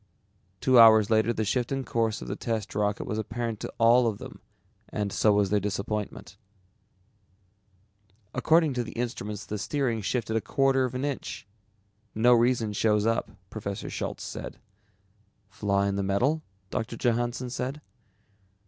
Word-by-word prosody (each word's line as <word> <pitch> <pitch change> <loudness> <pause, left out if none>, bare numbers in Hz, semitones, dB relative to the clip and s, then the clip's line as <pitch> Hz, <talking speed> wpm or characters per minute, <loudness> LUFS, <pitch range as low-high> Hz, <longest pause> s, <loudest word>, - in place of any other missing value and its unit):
Two 130 -2 +5
hours 110 -2 +7
later 110 +1 +3
the 110 -2 -1
shift 120 +4 -1
in 135 -1 -1
course 115 - -1
of - - -9
the - - -3
test 110 -2 -3
rocket 105 0 0
was 105 - -3
apparent 115 0 -3
to - - -5
all 120 +1 +5
of 110 -3 -1
them 130 +4 -10 0.5
and 105 -2 -3
so 110 - +3
was 100 -1 +2
their 105 - +3
disappointment. 105 0 -4 2.0
"According 160 +3 +3
to 125 -1 -1
the 110 - -9
instruments 105 -4 -4
the 105 +2 -4
steering 125 -2 -1
shifted 110 +2 -2
a 110 - +2
quarter 135 0 +2
of 125 0 -5
an 130 +2 -1
inch. 140 -7 -4 0.7
No 120 +3 +5
reason 120 -2 +2
shows 105 0 +2
up," 115 0 0 0.2
Professor - - -5
Schultz - - -4
said. - - -7 0.9
"Flaw 100 +1 0
in 100 0 0
the - - 0
metal?" 120 +11 +1 0.3
Doctor 115 +1 -3
Johannsen 120 +1 -1
said. 130 +4 -3
115 Hz, 155 wpm, -27 LUFS, 105-125 Hz, 2.0 s, hours